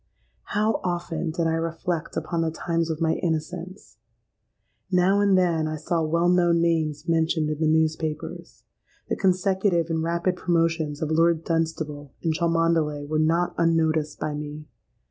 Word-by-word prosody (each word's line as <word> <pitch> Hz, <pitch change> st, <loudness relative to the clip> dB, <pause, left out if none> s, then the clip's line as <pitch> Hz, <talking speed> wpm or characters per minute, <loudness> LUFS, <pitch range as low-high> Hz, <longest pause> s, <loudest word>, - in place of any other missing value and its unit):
"How 215 Hz, +2 st, +1 dB
often 175 Hz, -2 st, -2 dB
did 165 Hz, +1 st, -1 dB
I 165 Hz, -, +1 dB
reflect 165 Hz, +1 st, -3 dB
upon 165 Hz, +2 st, -2 dB
the 165 Hz, -, +1 dB
times 165 Hz, 0 st, -2 dB
of 160 Hz, -1 st, -2 dB
my 160 Hz, -1 st, +2 dB
innocence! 170 Hz, -, -4 dB, 0.9 s
Now 185 Hz, +2 st, +3 dB
and 200 Hz, -2 st, +4 dB
then 170 Hz, -4 st, +2 dB
I 155 Hz, -, -3 dB
saw 165 Hz, +2 st, -1 dB
well 170 Hz, +2 st, +1 dB
known 175 Hz, -1 st, +3 dB
names 160 Hz, -2 st, 0 dB
mentioned 160 Hz, -2 st, +1 dB
in 155 Hz, -, -4 dB
the 160 Hz, -, +2 dB
newspapers. 155 Hz, -1 st, -1 dB, 0.5 s
The -, -, +1 dB
consecutive 185 Hz, -2 st, +1 dB
and 160 Hz, 0 st, 0 dB
rapid 170 Hz, +2 st, 0 dB
promotions 165 Hz, -4 st, 0 dB
of 155 Hz, -, -2 dB
Lord 165 Hz, 0 st, +3 dB
Dunstable 160 Hz, -4 st, -3 dB
and 165 Hz, -2 st, +1 dB
Cholmondeley 165 Hz, -3 st, +1 dB
were 155 Hz, +1 st, 0 dB
not 165 Hz, +3 st, +2 dB
unnoticed 160 Hz, -2 st, +1 dB
by 150 Hz, -, -2 dB
me. 150 Hz, +1 st, -6 dB
165 Hz, 150 wpm, -25 LUFS, 155-170 Hz, 0.9 s, and